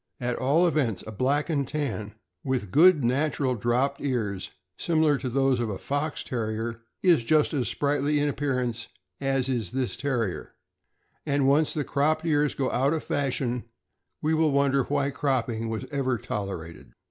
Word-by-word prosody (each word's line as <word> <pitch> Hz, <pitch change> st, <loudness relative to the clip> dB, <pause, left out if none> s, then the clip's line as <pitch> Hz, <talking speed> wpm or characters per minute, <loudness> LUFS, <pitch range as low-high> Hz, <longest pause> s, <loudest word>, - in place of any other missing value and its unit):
At 125 Hz, -1 st, -1 dB
all 145 Hz, +7 st, +3 dB
events, 140 Hz, -, 0 dB
a 110 Hz, -, -7 dB
Black 135 Hz, +7 st, 0 dB
and 140 Hz, -5 st, 0 dB
Tan 110 Hz, -9 st, -3 dB, 0.3 s
with 130 Hz, -8 st, -2 dB
good 160 Hz, -1 st, +6 dB
natural 135 Hz, +1 st, +1 dB
dropped 125 Hz, +5 st, 0 dB
ears, 110 Hz, -8 st, -2 dB, 0.3 s
similar 155 Hz, -4 st, +2 dB
to 130 Hz, -, -3 dB
those 135 Hz, 0 st, +2 dB
of 120 Hz, -2 st, -1 dB
a 100 Hz, -, -3 dB
Fox 145 Hz, +2 st, -2 dB
Terrier, 115 Hz, -1 st, -3 dB, 0.2 s
is 170 Hz, -10 st, +5 dB
just 150 Hz, +7 st, +3 dB
as 130 Hz, -6 st, 0 dB
sprightly 145 Hz, +3 st, 0 dB
in 145 Hz, -, +1 dB
appearance 125 Hz, -5 st, -1 dB, 0.3 s
as 135 Hz, -2 st, 0 dB
is 120 Hz, -8 st, -2 dB
this 130 Hz, -2 st, -1 dB
Terrier; 120 Hz, -9 st, -2 dB, 0.7 s
and 140 Hz, -2 st, +1 dB
once 145 Hz, +3 st, +4 dB
the 150 Hz, -, -1 dB
cropped 150 Hz, +4 st, 0 dB
ears 150 Hz, -2 st, +2 dB
go 135 Hz, -2 st, -1 dB
out 135 Hz, +4 st, +2 dB
of 160 Hz, -, -2 dB
fashion, 130 Hz, -3 st, -1 dB, 0.6 s
we 155 Hz, +1 st, +2 dB
will 160 Hz, -1 st, +3 dB
wonder 140 Hz, -1 st, +2 dB
why 140 Hz, 0 st, 0 dB
cropping 120 Hz, -5 st, -1 dB
was 110 Hz, -2 st, -3 dB
ever 130 Hz, -3 st, 0 dB
tolerated. 95 Hz, -6 st, -6 dB
135 Hz, 160 wpm, -26 LUFS, 120-145 Hz, 0.7 s, good